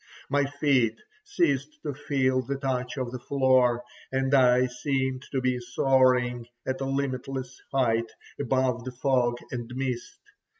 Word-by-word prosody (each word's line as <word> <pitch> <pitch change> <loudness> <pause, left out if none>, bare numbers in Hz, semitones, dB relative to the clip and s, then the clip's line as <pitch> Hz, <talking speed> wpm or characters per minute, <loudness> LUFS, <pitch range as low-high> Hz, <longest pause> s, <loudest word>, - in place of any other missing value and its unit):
My 145 0 +3
feet 135 -6 +1 0.3
ceased 150 - 0
to 145 - -3
feel 135 -2 +1
the 135 +2 -3
touch 130 -2 -2
of 130 -2 -2
the 125 - -5
floor, 130 -2 +3 0.3
and 135 +1 0
I 125 -1 +5
seemed 130 +1 -1
to 130 - 0
be 125 -1 +1
soaring 125 -1 +2 0.2
at 130 0 -2
a - - 0
limitless 135 -1 -3
height 115 -4 +1 0.3
above 130 -3 +1
the 130 - -5
fog 125 -2 +1
and 120 -1 -5
mist. 130 -2 -3
130 Hz, 140 wpm, -27 LUFS, 125-135 Hz, 0.3 s, I